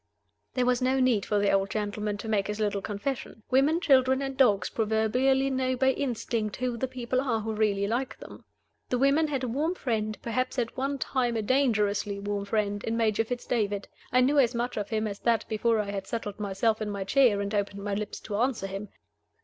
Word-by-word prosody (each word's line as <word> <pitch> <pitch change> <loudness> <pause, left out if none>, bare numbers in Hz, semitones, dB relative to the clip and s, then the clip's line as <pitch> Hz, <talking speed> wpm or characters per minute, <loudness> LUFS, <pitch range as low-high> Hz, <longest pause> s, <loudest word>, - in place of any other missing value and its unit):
There 250 -1 +2
was 250 0 +2
no 260 +1 +2
need 250 -6 +2
for 210 - +1
the 205 0 +3
old 195 0 +2
gentleman 210 0 -2
to 215 - -7
make 205 -3 +1
his 210 +1 -4
little 205 -2 0
confession. 215 +2 -4
Women, 280 +6 +4
children, 265 -4 +4
and 270 -1 -4
dogs 210 -8 +4
proverbially 250 +5 +2
know 260 -1 0
by 265 +1 +3
instinct 230 -5 -2
who 250 -1 -2
the 260 +3 -2
people 255 0 -2
are 235 -5 0
who 220 +1 -3
really 210 -2 +1
like 240 +5 -2
them. - - -12 0.5
The 250 - +1
women 280 +5 +3
had 275 -3 -2
a - - 0
warm 300 +9 -1
friend 215 -7 -2
perhaps 255 +3 -1
at 235 -2 -1
one 275 +2 -1
time 250 -3 0
a 220 - -1
dangerously 210 -5 +1
warm 200 0 -3
friend 205 -1 -1
in 225 0 -1
Major 225 -1 +2
Fitz 245 +2 -5
David. 205 -4 -1 0.2
I 255 - +4
knew 280 +3 +4
as 245 -2 +3
much 240 +1 -2
of 205 -2 -3
him 220 -1 0
as 200 -2 -4
that 230 -2 +1
before 225 +1 +1
I 205 -1 -2
had 195 -1 -5
settled 210 -3 -4
myself 210 +2 0
in 215 - -2
my 200 -1 -3
chair 230 0 +4
and 200 +1 -3
opened 200 -1 -2
my 205 0 -2
lips 210 +1 -4
to 205 -2 -4
answer 245 -3 0
him. 195 +1 -5
225 Hz, 215 wpm, -28 LUFS, 205-255 Hz, 0.5 s, Women